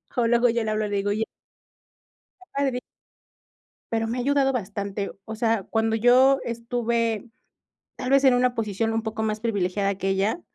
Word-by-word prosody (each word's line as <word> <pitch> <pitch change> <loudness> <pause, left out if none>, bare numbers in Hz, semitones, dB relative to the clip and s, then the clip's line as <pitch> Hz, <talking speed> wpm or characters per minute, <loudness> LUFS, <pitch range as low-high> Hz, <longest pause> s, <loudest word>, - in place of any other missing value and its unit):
O 240 -2 +2
luego 240 +1 +4
yo 230 0 0
le 215 - -1
hablo, 215 0 0
le 205 - -2
digo: 200 +1 0
"Oye" 220 +2 0 1.2
que 370 - -17
padre 270 -3 0 1.1
Pero, 225 0 0
me 235 +3 -3
ha - - -1
ayudado 275 0 +2
bastante. 200 -2 -3
O 220 - -6
sea, 225 -3 +1
cuando 225 0 +1
yo 255 +4 +5
estuve, 235 -1 -1 0.7
tal 255 - -4
vez, 275 0 +4
en 260 -2 +6
una 245 0 +2
posición 225 +1 -1
un 225 0 -1
poco 220 0 -3
más 215 0 -1
privilegiada 200 -3 0
que 195 0 -2
ella, 200 - 0
225 Hz, 175 wpm, -25 LUFS, 210-245 Hz, 1.2 s, en